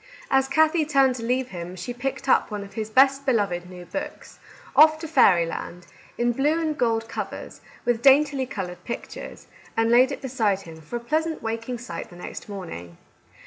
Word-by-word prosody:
As 270 0 +3
Kathie 315 +3 +3
turned 275 -3 +3
to 230 - -6
leave 250 +2 0
him, 175 0 -7
she 185 +7 -5
picked 270 +2 -4
up - - +3
one 210 -2 -4
of 200 - -12
his 220 -1 -4
best 270 +4 +4
beloved 200 -9 0
new 180 -1 -10
books, 290 +10 -7
— - - -20
" - - -21
Off 310 +1 +7
to 320 +1 -6
Fairyland," 175 - +2 0.3
in 240 0 +2
blue 290 +6 +1
and 315 -2 -1
gold 225 -4 0
covers, - - -6 0.2
with 240 -1 +1
daintily 275 0 +4
coloured 185 -7 -6
pictures, 235 - -7 0.2
— - - -25
and 225 0 +2
laid 255 +3 +5
it - - -4
beside 220 -7 0
him 160 -3 -12
for 160 +10 -8
a - - -1
pleasant 315 +6 -1
waking 230 +2 -3
sight 225 -8 -7
the 175 - -14
next 180 - -8
morn 190 -4 -7
ing. 85 0 -9
240 Hz, 200 wpm, -24 LUFS, 195-275 Hz, 0.3 s, Off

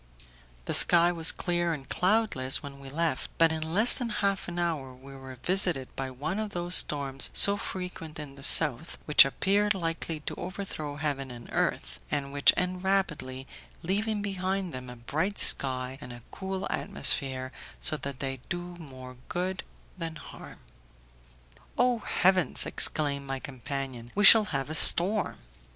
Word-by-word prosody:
The - - -3
sky 175 0 +5
was 165 -2 +1
clear 175 -1 -2
and 135 -3 -8
cloudless 180 -11 +1
when 140 -1 -10
we 135 -1 -11
left, 155 -1 -2
but 165 -1 +4
in 160 0 -3
less 185 +9 +7
than 245 -2 -2
half 200 -3 -2
an 175 0 -7
hour 155 -7 -3
we 135 +2 -14
were 130 -1 -11
visited 180 -8 0
by 135 -1 -4
one 145 +10 -5
of 215 -1 -5
those 175 0 -1
storms 140 -5 +3
so 200 - +7
frequent 180 -5 -6
in 150 -3 -8
the 140 - -14
south, 150 +1 +3
which 150 -2 +7
appear 200 +9 0
likely 165 -2 -4
to - - -6
overthrow 175 -5 -6
heaven 145 -3 -4
and 120 -1 -11
earth, - - -2
and 140 -1 -4
which 140 0 +6
end 180 0 -3
rapidly, 150 -10 -2 0.4
leaving 205 +4 -2
behind 190 -2 -3
them 125 -1 -8
a 125 - -9
bright 160 +12 -3
sky 130 0 0
and 125 - -10
a 120 -1 -12
cool 190 0 -5
atmosphere, 135 -9 +1 0.3
so - - +1
that 140 -2 -7
they 135 -1 -4
do 175 0 -6
more 130 -5 -12
good 185 +1 -3 0.4
than 165 -1 -5
harm. - - -12 1.2
"Oh, 245 -1 +2
heavens!" 185 -7 +1
exclaimed 140 -2 +2
my 135 0 -3
companion, 130 -2 -7
"we 205 0 +2
shall 220 +1 +8
have 135 -8 -4
a 155 - -6
storm." 190 +6 +3
160 Hz, 160 wpm, -27 LUFS, 135-185 Hz, 1.2 s, shall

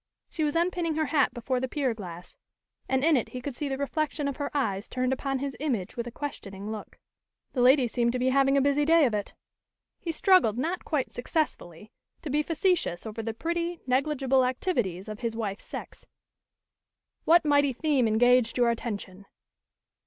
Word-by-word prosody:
She 315 - -2
was 295 0 0
unpinning 340 -1 0
her 315 0 +1
hat 285 -3 +2
before 250 +2 -2
the 260 - -2
pier 265 -2 -1
glass, 180 -5 -9 0.5
and 265 0 +1
in 320 0 +5
it 245 - 0
he 250 - -6
could 255 0 -6
see 285 +2 -3
the 270 - -2
reflection 285 +1 -2
of 280 - -3
her 285 - -2
eyes 205 -9 -1
turned 255 0 0
upon 270 +1 -2
his 275 0 -4
image 245 -11 -2
with 235 0 -4
a - - -6
questioning 210 -7 -6
look. 215 -1 -8 0.6
"The 250 - 0
ladies 255 -1 +5
seem 235 -1 +1
to 250 - -1
be 255 +1 +1
having 275 +1 +3
a - - +4
busy 285 +1 +2
day 325 0 +5
of 240 - 0
it." 205 -1 -3 0.6
He 340 - -3
struggled 325 - +4
not 335 +8 -2
quite 295 -5 -2
successfully 220 - -3 0.3
to 300 - -4
be 300 +2 +2
facetious 330 - 0
over 220 +1 -5
the 225 0 -4
pretty, 340 +4 -2
negligible 265 0 +2
activities 245 - -1
of 215 0 -6
his 230 -2 -3
wife's 210 -3 -4
sex. - - -8 1.2
"What 340 0 +5
mighty 285 -1 +4
theme 270 -2 +1
engaged 245 +2 +3
your 240 -1 +4
attention?" 200 -4 -6
260 Hz, 185 wpm, -27 LUFS, 230-300 Hz, 1.2 s, in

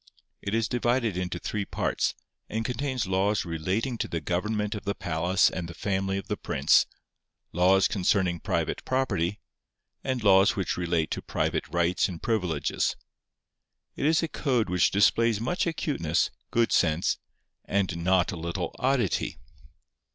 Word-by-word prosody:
It 100 +2 -2
is 115 -1 +1
divided 120 -3 0
into 90 0 -2
three 105 -1 -3
parts, - - -1 0.3
and 110 +1 -2
contains 125 0 -1
laws 95 +2 +1
relating 95 +9 -2
to - - -1
the 85 - -2
government 105 +5 -1
of 105 - -6
the 100 0 -2
palace 90 +3 +2
and 90 -2 -3
the 85 - -9
family 95 -1 -1
of 100 - -6
the - - -2
prince, - - +3 0.6
laws 95 +3 +4
concerning 95 -3 +1
private - - -2
property, 105 -8 0 0.6
and 130 -3 -2
laws 95 -1 +5
which 95 - -1
relate 85 -2 0
to - - -2
private - - -1
rights 85 +2 +1
and 85 -3 -6
privileges. 90 -10 0 1.0
It 145 - 0
is 160 +1 +3
a - - +1
code 125 - 0
which 90 -1 +4
displays 110 +2 +3
much 175 - -1
acuteness, 140 - 0 0.2
good 115 -1 +2
sense, 80 -1 +2 0.5
and 95 -4 0
not 90 0 +3
a - - -5
little 85 +2 -4
oddity. 130 -7 0
100 Hz, 150 wpm, -27 LUFS, 90-115 Hz, 1.0 s, laws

